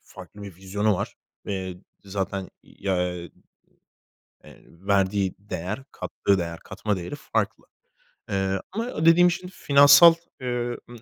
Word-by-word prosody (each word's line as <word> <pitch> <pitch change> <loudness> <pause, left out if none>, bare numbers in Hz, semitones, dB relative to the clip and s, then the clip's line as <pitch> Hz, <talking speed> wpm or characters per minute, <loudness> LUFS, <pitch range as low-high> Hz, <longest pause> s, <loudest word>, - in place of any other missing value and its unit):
farklı 105 - -13
bir 95 -4 -9
vizyonu 100 +2 0
var - - -4 0.3
ve 95 -2 -3 0.3
zaten 95 -1 -3
ya, 90 -2 -2
eee, 85 -1 -9 1.1
eee, - - -16
verdiği 95 +1 0
değer, 100 +4 -5
kattığı 100 -1 0
değer, 85 -1 -4
katma 100 +1 -3
değeri 90 0 -6
farklı. - - -2 0.7
Eee, 95 -1 0
ama 225 -6 -3
dediğim 175 +2 +7
şimdi 185 +1 -6
finansal, 145 +4 +7 0.3
eee, 120 -1 -2
ımm, 120 -1 -11
100 Hz, 125 wpm, -25 LUFS, 95-125 Hz, 1.1 s, dediğim